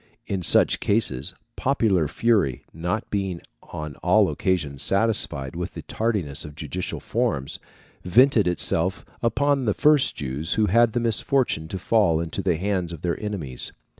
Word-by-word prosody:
In 95 Hz, -2 st, -3 dB
such 85 Hz, -, +4 dB
cases, 95 Hz, -, +1 dB, 0.2 s
popular 110 Hz, -, +1 dB
fury, 95 Hz, -, +1 dB
not 90 Hz, +6 st, -3 dB
being 95 Hz, -4 st, -2 dB, 0.2 s
on 75 Hz, -2 st, -7 dB
all -, -, +3 dB
occasions 75 Hz, -7 st, -1 dB
satisfied 95 Hz, -10 st, 0 dB
with -, -, -5 dB
the -, -, -7 dB
tardiness 100 Hz, -11 st, -2 dB
of 75 Hz, -1 st, -10 dB
judicial 80 Hz, +3 st, -5 dB
forms, 70 Hz, 0 st, -2 dB, 0.4 s
vented 115 Hz, +3 st, +4 dB
itself 90 Hz, +1 st, +1 dB, 0.2 s
upon 135 Hz, +3 st, +1 dB
the 105 Hz, -, +1 dB
first 150 Hz, -2 st, +3 dB
Jews 70 Hz, +3 st, -3 dB
who 110 Hz, -, +3 dB
had 115 Hz, +3 st, +3 dB
the -, -, +1 dB
misfortune 115 Hz, -, 0 dB
to 95 Hz, -, -5 dB
fall 95 Hz, -4 st, +2 dB
into 85 Hz, +4 st, -3 dB
the 90 Hz, -3 st, +1 dB
hands 95 Hz, -1 st, -1 dB
of 85 Hz, -3 st, -9 dB
their 85 Hz, -1 st, -2 dB
enemies. 90 Hz, -, -3 dB
95 Hz, 150 wpm, -24 LUFS, 80-110 Hz, 0.4 s, such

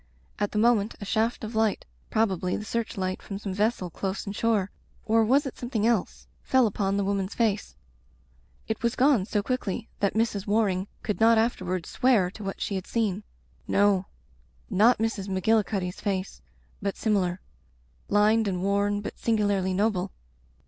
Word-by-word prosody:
At 205 Hz, -1 st, 0 dB
the -, -, -3 dB
moment 220 Hz, -1 st, +3 dB
a 205 Hz, -, -6 dB
shaft 225 Hz, +4 st, 0 dB
of 220 Hz, +2 st, -5 dB
light, 220 Hz, -2 st, +1 dB, 0.2 s
probably 190 Hz, -5 st, 0 dB
the 210 Hz, -, -6 dB
search 230 Hz, -1 st, -3 dB
light 185 Hz, -1 st, -2 dB
from 195 Hz, -, -6 dB
some 200 Hz, -1 st, -5 dB
vessel 205 Hz, -3 st, 0 dB
close 190 Hz, +4 st, -3 dB
inshore 205 Hz, -1 st, 0 dB, 0.2 s
— -, -, -33 dB
or 225 Hz, 0 st, +4 dB
was 270 Hz, +7 st, +3 dB
it 270 Hz, -, -6 dB
something 240 Hz, -4 st, -1 dB
else? 230 Hz, -5 st, 0 dB
— -, -, -26 dB
^fell 260 Hz, -2 st, +6 dB
upon 200 Hz, -2 st, 0 dB
the 200 Hz, -, +1 dB
woman's 195 Hz, 0 st, -1 dB
face. 210 Hz, -, 0 dB, 0.9 s
It 220 Hz, -, -3 dB
was 235 Hz, +1 st, 0 dB
gone 255 Hz, -7 st, +3 dB
so 210 Hz, -2 st, 0 dB
quickly 235 Hz, -2 st, -3 dB
that 200 Hz, 0 st, +1 dB
Mrs. 220 Hz, -3 st, 0 dB
War 215 Hz, +1 st, +3 dB
ing 185 Hz, +1 st, -2 dB, 0.2 s
could 210 Hz, -, -2 dB
not 225 Hz, +1 st, +6 dB
afterward 185 Hz, -6 st, 0 dB
swear 220 Hz, -8 st, +2 dB
to 210 Hz, -, -10 dB
what 195 Hz, 0 st, -5 dB
she -, -, -2 dB
had 190 Hz, -2 st, -3 dB
seen. 215 Hz, -4 st, 0 dB, 0.5 s
No. 200 Hz, -2 st, +3 dB, 0.6 s
Not 220 Hz, +6 st, +5 dB
Mrs. 220 Hz, -3 st, -2 dB
Magillicuddy's 195 Hz, -1 st, 0 dB
face, 195 Hz, -2 st, -3 dB, 0.4 s
but 200 Hz, -1 st, -2 dB
similar. 190 Hz, -5 st, 0 dB, 0.7 s
Lined 215 Hz, +2 st, +4 dB
and 180 Hz, -2 st, -2 dB
worn 200 Hz, +1 st, +1 dB
but -, -, -7 dB
singularly 205 Hz, -4 st, +1 dB
noble. 195 Hz, -2 st, 0 dB
205 Hz, 170 wpm, -27 LUFS, 195-225 Hz, 0.9 s, ^fell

